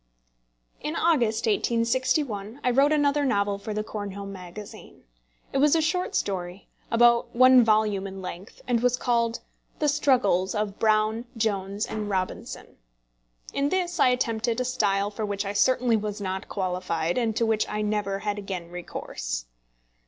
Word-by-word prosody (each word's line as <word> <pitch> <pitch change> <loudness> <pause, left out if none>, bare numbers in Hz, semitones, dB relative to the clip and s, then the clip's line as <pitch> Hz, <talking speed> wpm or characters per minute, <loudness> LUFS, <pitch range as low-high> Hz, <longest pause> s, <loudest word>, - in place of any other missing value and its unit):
In 300 +2 -3
August, 235 -11 +2
1861, 230 +1 0
I 250 - +2
wrote 275 +4 +4
another 290 -1 +2
novel 200 -6 +1
for 215 - -6
the 215 0 -2
Cornhill 200 -2 -6
Magazine. 195 +1 -10 0.5
It 270 - +1
was 295 +2 +5
a - - +3
short 360 +3 -1
story, 180 -1 -3 0.2
about 235 0 +3
one 255 0 +7
volume 215 -3 +2
in 195 0 -8
length, 185 +1 -9
and 240 -2 +1
was 250 0 +2
called 235 -2 0 0.4
The 300 - 0
Struggles 240 -11 +2
of 210 -1 -2
Brown, 215 +1 +2
Jones, 205 -1 -1
and 215 -1 -4
Robinson. 185 -2 -4 0.8
In 280 +1 +1
this 355 -1 -1
I - - +6
attempted 235 -1 0
a 255 - 0
style 205 -5 +1
for 215 +1 -5
which 200 -1 -2
I 200 - -3
certainly 250 +1 +3
was 210 0 -4
not 190 -1 -4
qualified, 180 -1 -1
and 225 -3 0
to 230 - +1
which 220 -1 +1
I 210 0 -2
never 210 -2 -1
had 205 +1 -3
again 185 -4 -6
recourse. - - -5
215 Hz, 155 wpm, -26 LUFS, 200-250 Hz, 0.8 s, one